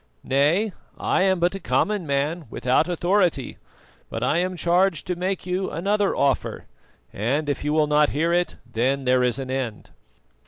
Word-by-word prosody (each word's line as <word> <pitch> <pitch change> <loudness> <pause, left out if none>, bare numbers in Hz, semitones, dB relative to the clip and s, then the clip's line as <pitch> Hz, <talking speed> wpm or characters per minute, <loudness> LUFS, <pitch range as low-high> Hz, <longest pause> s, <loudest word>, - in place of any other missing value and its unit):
"Nay, 155 +11 +2 0.3
I - - +1
am 190 -1 +3
but 175 +2 +2
a 195 - -5
common 200 0 0
man 145 +4 -1
without 130 +8 +1
authority; 175 -4 0 0.5
but 115 - -4
I 150 +6 +2
am 185 0 -2
charged 175 -1 +2
to 180 - -2
make 185 +2 -2
you 185 +1 -1
another 200 +5 0
offer, 140 -2 0 0.5
and 135 +9 -1
if 145 - -2
you 150 - -1
will 155 0 +3
not 150 0 +3
hear 165 +4 0
it 175 0 0
then 130 +4 -1
there 125 0 +3
is 125 -2 +1
an 130 -1 -5
end. 125 -5 -4
155 Hz, 170 wpm, -23 LUFS, 135-180 Hz, 0.5 s, am